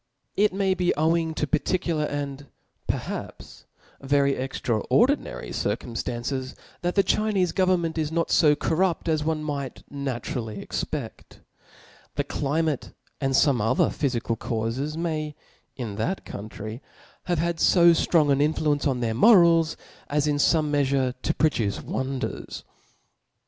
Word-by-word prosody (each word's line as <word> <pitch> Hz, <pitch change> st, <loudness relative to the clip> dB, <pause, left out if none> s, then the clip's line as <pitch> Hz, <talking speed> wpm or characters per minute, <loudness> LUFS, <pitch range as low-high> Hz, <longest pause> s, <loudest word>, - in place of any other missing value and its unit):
It 210 Hz, +1 st, +3 dB
may 190 Hz, 0 st, +1 dB
be 180 Hz, -1 st, +1 dB
owing 160 Hz, +1 st, +1 dB
to 150 Hz, -, 0 dB
particular, 165 Hz, 0 st, 0 dB
and 145 Hz, -1 st, -4 dB, 0.4 s
perhaps -, -, -5 dB, 0.4 s
ver 140 Hz, +1 st, +2 dB
y 140 Hz, -, +3 dB
extraordinary 135 Hz, -, 0 dB
circum 120 Hz, -, -2 dB
ftances; 125 Hz, +3 st, -3 dB, 0.3 s
that 175 Hz, 0 st, -1 dB
the 195 Hz, -, +5 dB
Chinefe 200 Hz, -5 st, +1 dB
government 175 Hz, -3 st, +1 dB
is 155 Hz, -1 st, -1 dB
not 165 Hz, 0 st, 0 dB
fo 150 Hz, -2 st, +5 dB
cor 160 Hz, +2 st, -1 dB
rupt 180 Hz, -2 st, +1 dB
as 155 Hz, -2 st, +1 dB
one 155 Hz, 0 st, -1 dB
might 140 Hz, -3 st, -4 dB
naturally 120 Hz, -5 st, -4 dB
expedt. -, -, -5 dB, 0.8 s
The -, -, 0 dB
climate 150 Hz, 0 st, -1 dB, 0.3 s
and 135 Hz, -1 st, 0 dB
fome 135 Hz, -3 st, +3 dB
other 110 Hz, -, +2 dB
phyfical 120 Hz, -5 st, -2 dB
caufes 120 Hz, +7 st, -2 dB
may, 155 Hz, -3 st, -2 dB, 0.4 s
in 110 Hz, -6 st, -5 dB
that 180 Hz, -, -2 dB
coun 105 Hz, +2 st, -7 dB
try, 110 Hz, +4 st, -7 dB, 0.4 s
have 175 Hz, -1 st, 0 dB
had 170 Hz, +1 st, -1 dB
fo 170 Hz, -2 st, +6 dB
ftrong 160 Hz, -3 st, +3 dB
an 140 Hz, 0 st, +3 dB
influence 150 Hz, -1 st, +1 dB
on 130 Hz, -3 st, -1 dB
their 115 Hz, -2 st, 0 dB
mo 215 Hz, -, +7 dB
rals, 165 Hz, -3 st, +4 dB, 0.3 s
as 145 Hz, 0 st, +1 dB
in 150 Hz, -1 st, +1 dB
fome 150 Hz, +1 st, +2 dB
meafure 135 Hz, -3 st, +1 dB
to 160 Hz, -, 0 dB
produce 115 Hz, -10 st, +1 dB
wonders. 130 Hz, 0 st, -4 dB
150 Hz, 145 wpm, -25 LUFS, 130-165 Hz, 0.8 s, mo